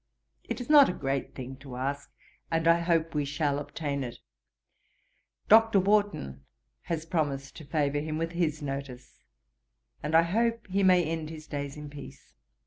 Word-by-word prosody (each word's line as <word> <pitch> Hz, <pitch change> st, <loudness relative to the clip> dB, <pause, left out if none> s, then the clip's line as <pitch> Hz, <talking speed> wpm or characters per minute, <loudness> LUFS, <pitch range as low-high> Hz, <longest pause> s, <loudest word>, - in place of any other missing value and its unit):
It 235 Hz, 0 st, -4 dB
is 245 Hz, -, -6 dB
not 295 Hz, -2 st, +8 dB
a -, -, -1 dB
great 135 Hz, -3 st, -3 dB
thing 130 Hz, 0 st, -7 dB
to 135 Hz, -2 st, -10 dB
ask, 140 Hz, +3 st, -3 dB, 0.4 s
and 165 Hz, 0 st, 0 dB
I 170 Hz, 0 st, +6 dB
hope 165 Hz, -1 st, +1 dB
we 150 Hz, -1 st, 0 dB
shall 145 Hz, 0 st, -1 dB
obtain 145 Hz, -1 st, -3 dB
it. 120 Hz, -2 st, -6 dB, 1.3 s
Dr. 225 Hz, -1 st, +6 dB
Warton 195 Hz, -, 0 dB, 0.4 s
has 165 Hz, -2 st, -3 dB
promised 145 Hz, -5 st, -2 dB
to 155 Hz, -, -10 dB
favour 145 Hz, -1 st, 0 dB
him 155 Hz, +1 st, -3 dB
with 165 Hz, +1 st, -2 dB
his 160 Hz, -3 st, -1 dB
notice, 135 Hz, -2 st, -6 dB, 0.8 s
and 150 Hz, +2 st, -1 dB
I 165 Hz, -, +7 dB
hope 230 Hz, +6 st, 0 dB
he 195 Hz, +1 st, 0 dB
may 185 Hz, -2 st, +5 dB
end 160 Hz, -1 st, -3 dB
his 155 Hz, -1 st, -9 dB
days 145 Hz, -1 st, -5 dB
in 150 Hz, 0 st, -7 dB
peace. 145 Hz, -1 st, -12 dB
155 Hz, 165 wpm, -28 LUFS, 140-175 Hz, 1.3 s, not